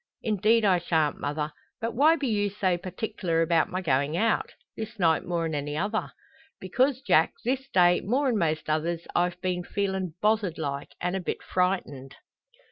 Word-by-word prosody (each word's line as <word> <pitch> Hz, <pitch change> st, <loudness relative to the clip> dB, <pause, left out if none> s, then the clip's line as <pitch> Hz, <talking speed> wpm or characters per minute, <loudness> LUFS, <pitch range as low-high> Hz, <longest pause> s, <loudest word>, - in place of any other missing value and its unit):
"Indeed 220 Hz, +1 st, +3 dB
I 185 Hz, -3 st, +4 dB
shan't, 160 Hz, -3 st, 0 dB
mother. 150 Hz, +1 st, -3 dB, 0.3 s
But 230 Hz, 0 st, -3 dB
why 300 Hz, +7 st, +5 dB
be 280 Hz, -4 st, -2 dB
you 205 Hz, -3 st, +1 dB
so 190 Hz, -3 st, 0 dB
partic'lar 180 Hz, -2 st, -2 dB
about 165 Hz, -1 st, +2 dB
my 185 Hz, +1 st, -3 dB
goin' 140 Hz, 0 st, +1 dB
out 220 Hz, +5 st, +1 dB, 0.2 s
this 220 Hz, +1 st, -6 dB
night 165 Hz, -4 st, +3 dB
more'n 165 Hz, -2 st, -2 dB
any 145 Hz, 0 st, -3 dB
other?" 210 Hz, +5 st, -1 dB, 0.5 s
"Because, 255 Hz, +8 st, +1 dB
Jack, 160 Hz, +1 st, +4 dB
this 265 Hz, +2 st, -1 dB
day, 175 Hz, -4 st, +4 dB
more'n 255 Hz, +3 st, +1 dB
most 155 Hz, -5 st, 0 dB
others, 165 Hz, +2 st, -1 dB
I've 175 Hz, 0 st, 0 dB
been 180 Hz, -1 st, -1 dB
feelin' 190 Hz, -3 st, -2 dB
bothered 210 Hz, -5 st, +1 dB
like, 140 Hz, -2 st, -4 dB
and 180 Hz, +1 st, -1 dB
a -, -, 0 dB
bit 180 Hz, -, -4 dB
frightened." 180 Hz, -8 st, -1 dB
180 Hz, 165 wpm, -27 LUFS, 165-215 Hz, 0.5 s, why